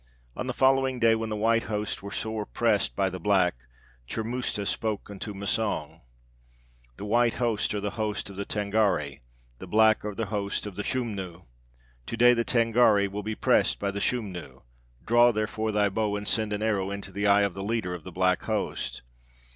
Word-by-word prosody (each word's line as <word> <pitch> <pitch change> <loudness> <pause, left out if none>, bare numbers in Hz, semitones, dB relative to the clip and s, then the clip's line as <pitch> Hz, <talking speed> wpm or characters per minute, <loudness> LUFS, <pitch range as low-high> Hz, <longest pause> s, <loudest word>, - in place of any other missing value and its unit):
"On 125 - -4
the - - 0
following 130 0 +2
day, 115 -1 +5
when 110 0 -2
the 110 - -2
white 115 +2 +2
host 105 -1 -2
were 100 - -7
sore 110 +1 -3
pressed - - +1
by 95 - +1
the 90 -1 -5
black, 95 -1 +3 0.6
Churmusta 115 -2 -2
spake 105 -1 -2
unto 100 +2 -6
Massang: 95 -6 -2 1.0
'The - - -6
white 120 +2 +2
host 115 -4 0
are - - -1
the 100 0 -3
host 110 -2 -3
of 100 - -9
the 100 - -3
Tângâri, 100 -9 0 0.4
the - - -8
black 110 0 +4
are 105 -1 -4
the 115 - -2
host 100 0 -2
of 105 -3 -7
the 105 - -3
Schumnu. 100 -8 -4 0.6
To 115 - -4
day 125 +1 +7
the 115 -1 +1
Tângâri 115 -4 +3
will 105 +1 -4
be 110 +1 -4
pressed - - +2
by 100 0 -2
the 100 +1 -4
Schumnu; 90 - -3 0.4
draw, 120 +1 +5
therefore, 110 0 -2
thy 105 -1 +2
bow, 105 +1 -1
and 105 0 -4
send 110 -2 +1
an 105 +1 -2
arrow 100 -3 0
into 100 -1 -5
the 100 +2 -1
eye 100 0 +5
of 100 -2 0
the 95 +1 -6
leader 105 -4 -2
of 90 -3 -7
the 90 - -9
black 90 +1 +1
host.' - - -2
105 Hz, 195 wpm, -27 LUFS, 100-115 Hz, 1.0 s, day